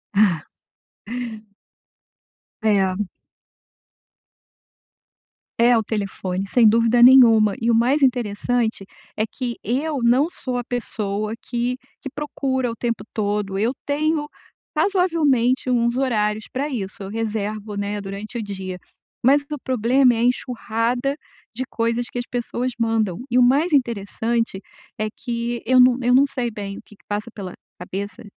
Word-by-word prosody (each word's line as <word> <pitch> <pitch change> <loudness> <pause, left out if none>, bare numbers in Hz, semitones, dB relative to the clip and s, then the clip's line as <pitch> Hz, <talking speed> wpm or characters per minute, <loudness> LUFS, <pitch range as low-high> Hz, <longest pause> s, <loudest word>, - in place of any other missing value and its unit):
Ah. 185 -7 +3 2.1
É. 200 -2 +1 2.5
É 240 +1 +6
o 225 - +3
telefone, 195 -3 -3
sem 225 +1 +5
dúvida 230 +2 +3
nenhuma, 230 -5 +7
e 230 +1 +2
o - - +4
mais 260 +6 +3
interessante, 235 -3 0 0.3
é 215 - +1
que 240 +1 -5
eu 275 +2 -1
não 260 +7 +4
sou 255 -8 -4
a - - -4
pessoa 215 -3 -3
que 245 +1 -2 0.2
que 275 - -6
procura 265 -4 -2
o 230 - -5
tempo 235 0 -2
todo, 205 -2 -1
eu 230 +5 +1
tenho 295 +1 0 0.5
razoavelmente 300 - +2
uns 235 -1 +2
horários 215 -5 0
pra 280 +3 -1
isso, 205 -7 -5
eu 195 - -6
reservo, 215 -1 -3
né, 205 +1 -2
durante 200 +4 -6
o 225 - -3
dia, 190 -2 -5 0.5
mas 280 +2 +6
o 295 - -2
problema 255 +1 +3
é - - -2
a - - +1
enxurrada 245 +2 0 0.4
de 260 - -2
coisas 230 +1 -1
que 245 - -5
as 245 - -4
pessoas 245 +1 -2
mandam, 225 -6 +1
e 250 +1 +3
o - - +6
mais 285 +7 +3
interessante, 230 -3 0 0.4
é 215 - 0
que 235 +1 -4
eu 255 +2 +4
não 250 -1 +6
eu 245 +1 +3
não 275 +2 +6
sei 240 -3 -3
bem 200 -2 -6
o - - -9
que 210 - -17
que - - -31
passa 210 +2 -3
pela 190 -3 -7 0.3
cabeça 195 +5 -6
235 Hz, 145 wpm, -22 LUFS, 210-255 Hz, 2.5 s, nenhuma